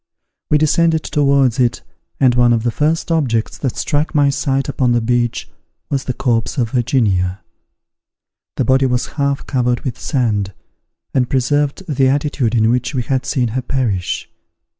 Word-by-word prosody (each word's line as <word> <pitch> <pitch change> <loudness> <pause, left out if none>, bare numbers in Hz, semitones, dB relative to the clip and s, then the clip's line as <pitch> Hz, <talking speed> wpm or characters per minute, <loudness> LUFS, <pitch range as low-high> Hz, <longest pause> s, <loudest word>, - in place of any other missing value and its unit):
We 150 - +4
descended 160 +1 +2
towards 140 -4 +2
it 120 -2 +1 0.4
and 130 -2 +4
one 120 -1 +4
of 115 -1 0
the 120 - 0
first 155 +7 0
objects 125 -9 0
that 130 -4 -3
struck 150 +1 -1
my 145 -1 +4
sight 135 0 -1
upon 130 -3 +1
the 120 - +3
beach 120 0 -1 0.4
was 135 -2 -1
the 130 - -2
corpse 120 -1 -1
of 115 -4 0
Virginia. 100 -7 0 1.1
The - - 0
body 130 0 +3
was 125 -1 0 0.2
half 140 0 0
covered 125 -2 0
with 125 -4 -5
sand, 105 -7 -1 0.6
and 125 -2 +1
preserved 145 +5 0
the 135 -4 +2
attitude 140 -4 0
in 110 0 +3
which 125 +2 -1
we 125 - 0
had 130 +1 -2
seen 125 -5 0
her 130 +4 -2
perish. 120 -9 -2
130 Hz, 160 wpm, -17 LUFS, 120-140 Hz, 1.1 s, We